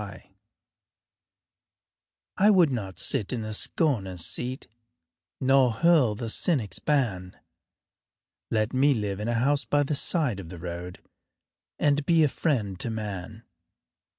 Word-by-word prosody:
I 205 Hz, +3 st, +5 dB
would 180 Hz, -8 st, +5 dB
not 95 Hz, -8 st, -4 dB
sit 105 Hz, -, 0 dB
in 120 Hz, -3 st, -2 dB
the 110 Hz, 0 st, -5 dB
scorner's 100 Hz, -, 0 dB
seat 130 Hz, +3 st, -4 dB, 0.7 s
Nor 130 Hz, -1 st, +4 dB
hurl 140 Hz, -4 st, +3 dB
the 115 Hz, +2 st, -5 dB
cynic's 115 Hz, -, 0 dB
ban 105 Hz, -11 st, -1 dB, 1.1 s
Let 110 Hz, +1 st, 0 dB
me 135 Hz, +2 st, +3 dB
live 105 Hz, -3 st, -3 dB
in 105 Hz, -, -4 dB
a 120 Hz, -, 0 dB
house 140 Hz, +5 st, +1 dB
by 145 Hz, 0 st, +1 dB
the 145 Hz, -, -2 dB
side 145 Hz, -, +1 dB
of 85 Hz, -4 st, -9 dB
the 90 Hz, -, -9 dB
road 90 Hz, +1 st, -7 dB, 0.7 s
And 145 Hz, 0 st, +1 dB
be 165 Hz, +1 st, +3 dB
a -, -, +4 dB
friend 110 Hz, -, -2 dB
to 120 Hz, -, -3 dB
man. 110 Hz, -1 st, -6 dB
120 Hz, 130 wpm, -26 LUFS, 100-145 Hz, 1.1 s, I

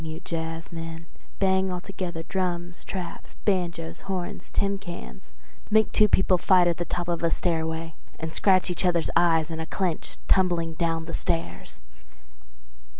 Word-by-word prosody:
you 160 Hz, 0 st, -5 dB
jazzmen, 165 Hz, 0 st, -5 dB, 0.3 s
bang 190 Hz, -1 st, +2 dB
altogether 180 Hz, -2 st, -4 dB
drums, 175 Hz, -1 st, -2 dB
traps, 185 Hz, -3 st, -6 dB
banjoes, 170 Hz, -4 st, 0 dB
horns, 185 Hz, -2 st, -3 dB
tin 200 Hz, 0 st, 0 dB
cans—make 65 Hz, -, -3 dB
two 215 Hz, -, +5 dB
people 190 Hz, -2 st, +4 dB
fight 180 Hz, -1 st, +5 dB
on 170 Hz, -, +4 dB
the 175 Hz, -, -2 dB
top 175 Hz, +1 st, -2 dB
of 170 Hz, -1 st, -1 dB
a 170 Hz, -, +3 dB
stairway 165 Hz, -1 st, -1 dB, 0.3 s
and 160 Hz, 0 st, -4 dB
scratch 185 Hz, 0 st, +4 dB
each 175 Hz, -, -3 dB
other's 175 Hz, -2 st, +2 dB
eyes 165 Hz, -2 st, +4 dB
in 160 Hz, -, -4 dB
a 160 Hz, -, -3 dB
clinch 180 Hz, -4 st, -2 dB
tumbling 175 Hz, -3 st, +3 dB
down 165 Hz, 0 st, 0 dB
the 165 Hz, -, -6 dB
stairs. 85 Hz, +1 st, -2 dB
170 Hz, 145 wpm, -26 LUFS, 165-185 Hz, 0.3 s, two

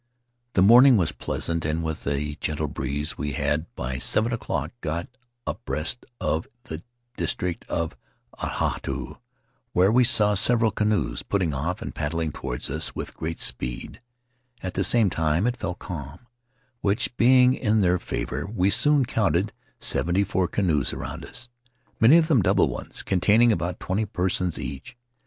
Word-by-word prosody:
The 95 Hz, -, +4 dB
morning 120 Hz, +4 st, +8 dB
was 85 Hz, -5 st, +2 dB
pleasant, 85 Hz, +1 st, -3 dB
and 80 Hz, +2 st, -1 dB
with 80 Hz, -2 st, -4 dB
a 70 Hz, +1 st, -1 dB
gentle 75 Hz, 0 st, -1 dB
breeze 70 Hz, +2 st, -3 dB
we 75 Hz, -1 st, -2 dB
had, 75 Hz, +5 st, -1 dB
by 65 Hz, +1 st, -4 dB
seven 115 Hz, +2 st, +1 dB
o'clock, 115 Hz, -, -3 dB
got 85 Hz, +3 st, -3 dB, 0.4 s
abreast 80 Hz, +10 st, -3 dB
of 80 Hz, +2 st, -1 dB, 0.2 s
the 130 Hz, -, -7 dB, 0.4 s
district 90 Hz, -2 st, -2 dB
of 80 Hz, -4 st, -2 dB, 0.4 s
Atahooroo, -, -, -3 dB, 0.5 s
whence 95 Hz, +4 st, +4 dB
we 125 Hz, +1 st, +5 dB
saw 105 Hz, -4 st, +4 dB
several 115 Hz, +2 st, +4 dB
canoes 100 Hz, -, 0 dB
putting 95 Hz, -6 st, -1 dB
off 80 Hz, +7 st, -3 dB
and -, -, -6 dB
paddling 80 Hz, +1 st, -2 dB
toward 60 Hz, -3 st, -4 dB
us 80 Hz, +3 st, -1 dB
witk -, -, -6 dB
great 80 Hz, +1 st, -5 dB
speed; -, -, -3 dB, 0.6 s
at 95 Hz, -, -3 dB
the 95 Hz, -, 0 dB
same 110 Hz, -2 st, +4 dB
time 80 Hz, +4 st, +1 dB
it 125 Hz, 0 st, +1 dB
fell 95 Hz, -6 st, -3 dB
calm, 85 Hz, -, -8 dB, 0.5 s
which, 105 Hz, +4 st, 0 dB
being 125 Hz, +1 st, +5 dB
in 110 Hz, -4 st, +1 dB
their 90 Hz, -1 st, +3 dB
favor, 70 Hz, -1 st, -4 dB
we 100 Hz, -2 st, +1 dB
soon 145 Hz, +1 st, +4 dB
counted 105 Hz, -4 st, 0 dB, 0.3 s
seventy 90 Hz, +4 st, +1 dB
four 95 Hz, -2 st, 0 dB
canoes 85 Hz, -7 st, 0 dB
around -, -, -6 dB
us, 125 Hz, 0 st, -6 dB, 0.5 s
many 120 Hz, +8 st, +7 dB
of 165 Hz, -2 st, +3 dB
them 140 Hz, -9 st, +4 dB
double -, -, +3 dB
ones, -, -, -5 dB
containing 105 Hz, +6 st, +4 dB
about 85 Hz, -2 st, -2 dB
twenty 100 Hz, +4 st, -1 dB
persons 90 Hz, -3 st, 0 dB
each. 70 Hz, -, -7 dB
90 Hz, 155 wpm, -25 LUFS, 75-110 Hz, 0.6 s, morning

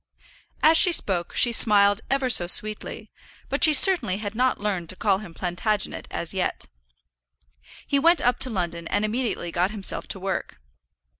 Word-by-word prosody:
As 320 Hz, +1 st, +4 dB
she 370 Hz, -, +6 dB
spoke 180 Hz, -, -1 dB
she 240 Hz, -, +1 dB
smiled 205 Hz, -2 st, +4 dB
ever 270 Hz, -1 st, -2 dB
so 180 Hz, -8 st, +2 dB
sweetly, 215 Hz, +4 st, 0 dB, 0.4 s
but -, -, -3 dB
she 310 Hz, -, +7 dB
certainly 295 Hz, -, +6 dB
had 205 Hz, -1 st, -8 dB
not 250 Hz, +3 st, -2 dB
learned 190 Hz, -5 st, -5 dB
to -, -, -1 dB
call 195 Hz, -1 st, -2 dB
him 185 Hz, -6 st, -13 dB
Plantagenet 190 Hz, +3 st, -4 dB
as 170 Hz, +1 st, -7 dB
yet. 190 Hz, -1 st, -5 dB, 1.2 s
He 280 Hz, -, -1 dB
went 335 Hz, +4 st, +2 dB
up 245 Hz, 0 st, -2 dB
to 270 Hz, -1 st, 0 dB
London 170 Hz, -5 st, -6 dB
and 205 Hz, -, -3 dB
immediately 215 Hz, -6 st, -5 dB
got 180 Hz, +3 st, -2 dB
himself 205 Hz, -2 st, -2 dB
to 195 Hz, -, -6 dB
work. 190 Hz, -, -7 dB
210 Hz, 165 wpm, -22 LUFS, 185-250 Hz, 1.2 s, she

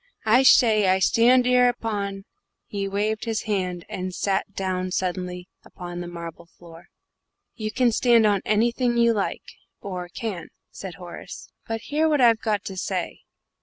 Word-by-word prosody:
I 225 Hz, +4 st, +5 dB
shay, 220 Hz, -6 st, +5 dB
I 185 Hz, 0 st, +4 dB
shtand 240 Hz, +6 st, +4 dB
'ere 250 Hz, 0 st, +5 dB
upon 200 Hz, -5 st, -4 dB, 0.2 s
" -, -, -57 dB
Here 205 Hz, -, -6 dB
he 195 Hz, -, -1 dB
waved 210 Hz, +3 st, -1 dB
his 225 Hz, -1 st, -2 dB
hand, 185 Hz, -5 st, -2 dB
and 185 Hz, 0 st, -5 dB
sat 195 Hz, 0 st, -1 dB
down 185 Hz, -1 st, -2 dB
suddenly 180 Hz, -1 st, -3 dB, 0.2 s
upon 175 Hz, -1 st, -8 dB
the 175 Hz, -, -6 dB
marble 170 Hz, -1 st, -9 dB
floor. 170 Hz, -1 st, -14 dB, 0.7 s
"You 215 Hz, -2 st, -4 dB
can 245 Hz, +1 st, +2 dB
stand 235 Hz, -1 st, +4 dB
on 205 Hz, -2 st, +2 dB
anything 240 Hz, +3 st, +1 dB
you 235 Hz, 0 st, +4 dB
like 205 Hz, -3 st, -2 dB, 0.4 s
or 180 Hz, -3 st, -6 dB
can," 185 Hz, -4 st, -5 dB, 0.2 s
said 190 Hz, -3 st, -8 dB
Horace; 175 Hz, -2 st, -10 dB, 0.2 s
"but 225 Hz, 0 st, -3 dB
hear 305 Hz, +5 st, 0 dB
what 300 Hz, -2 st, +2 dB
I've 230 Hz, -3 st, +5 dB
got 215 Hz, -3 st, -1 dB
to 190 Hz, -, -6 dB
say. 185 Hz, -1 st, -3 dB
205 Hz, 165 wpm, -24 LUFS, 185-230 Hz, 0.7 s, I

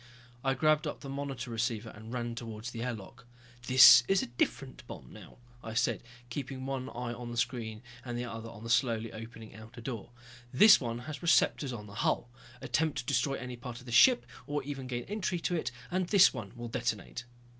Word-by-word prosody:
I 135 Hz, 0 st, +1 dB
grabbed 155 Hz, +3 st, +2 dB
up -, -, -5 dB
the 140 Hz, -, -8 dB
monitor 135 Hz, -2 st, -5 dB
receiver 115 Hz, -1 st, -2 dB
and 110 Hz, +2 st, -11 dB
ran 120 Hz, -1 st, -3 dB
towards 115 Hz, 0 st, -6 dB
the 115 Hz, -, -6 dB
air 125 Hz, +1 st, -1 dB
lock. 120 Hz, +3 st, -11 dB, 0.4 s
"This 130 Hz, -1 st, +10 dB
is 195 Hz, -1 st, +3 dB
a -, -, -2 dB
different 130 Hz, +3 st, -2 dB
bomb -, -, -10 dB
now," 110 Hz, -4 st, -13 dB, 0.3 s
I 115 Hz, 0 st, -6 dB
said, 125 Hz, -, +1 dB, 0.3 s
keeping 130 Hz, 0 st, -5 dB
one 135 Hz, -1 st, -3 dB
eye 120 Hz, -1 st, -4 dB
on 120 Hz, 0 st, -7 dB
the 120 Hz, -, -6 dB
screen 115 Hz, -2 st, -2 dB, 0.2 s
and 120 Hz, -2 st, -4 dB
the 120 Hz, -, -3 dB
other 115 Hz, -1 st, -7 dB
on 115 Hz, -1 st, -11 dB
the 115 Hz, -, -6 dB
slowly 115 Hz, -2 st, +1 dB
opening 115 Hz, 0 st, -10 dB
outer 110 Hz, +2 st, -12 dB
door. 115 Hz, -3 st, -6 dB, 0.4 s
"This 210 Hz, +11 st, +8 dB
one 115 Hz, -2 st, -3 dB
has 155 Hz, 0 st, -6 dB
receptors 160 Hz, -4 st, +3 dB
on 110 Hz, -4 st, -7 dB
the 100 Hz, -, -12 dB
hull. 120 Hz, -, 0 dB, 0.3 s
Attempt 155 Hz, -1 st, 0 dB
to -, -, -3 dB
destroy 135 Hz, +1 st, +1 dB
any 125 Hz, -1 st, -6 dB
part 120 Hz, 0 st, -7 dB
of 125 Hz, -, -15 dB
this 120 Hz, -, -6 dB
ship, 250 Hz, -, +6 dB, 0.2 s
or 145 Hz, -1 st, -2 dB
even 135 Hz, -2 st, -6 dB
gain 120 Hz, -1 st, -3 dB
entry 190 Hz, -4 st, -2 dB
to 180 Hz, -, -1 dB
it, 155 Hz, -6 st, -1 dB, 0.2 s
and 185 Hz, 0 st, 0 dB
this 195 Hz, 0 st, +6 dB
one 100 Hz, -1 st, -7 dB
will 120 Hz, 0 st, -6 dB
detonate." 120 Hz, 0 st, -3 dB
120 Hz, 210 wpm, -31 LUFS, 115-135 Hz, 0.4 s, This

